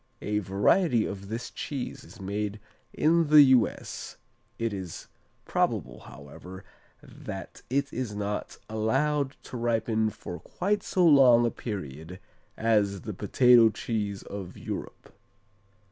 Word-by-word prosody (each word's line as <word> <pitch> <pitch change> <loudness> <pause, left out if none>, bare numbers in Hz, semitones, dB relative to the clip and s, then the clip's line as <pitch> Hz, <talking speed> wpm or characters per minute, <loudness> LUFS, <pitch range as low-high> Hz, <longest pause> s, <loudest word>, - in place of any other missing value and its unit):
A 105 0 0
variety 110 - +2
of 100 0 -6
this 115 +3 -5
cheese 135 -4 -5
is 120 - -15
made 105 +2 -3 0.3
in 165 +1 +2
the 150 0 +9
U.S. 120 -5 -1 0.4
It 115 -2 -2
is 95 -4 -7 0.4
probable, - - -1
however, 90 +7 -11 0.4
that - - -9
it 140 +2 -1
is 120 -4 -3
not 105 0 -4
allowed 135 +6 0
to 125 - -7
ripen 115 -2 +1
for 90 -4 -8
quite 200 - -1
so 180 -2 +1
long 130 -6 +7
a 120 - +1
period 90 - -7 0.4
as 105 -4 +1
the 110 - -6
potato 115 +4 +5
cheese 105 -2 -3
of 100 -3 -8
Europe. - - -7
110 Hz, 125 wpm, -27 LUFS, 100-130 Hz, 0.4 s, the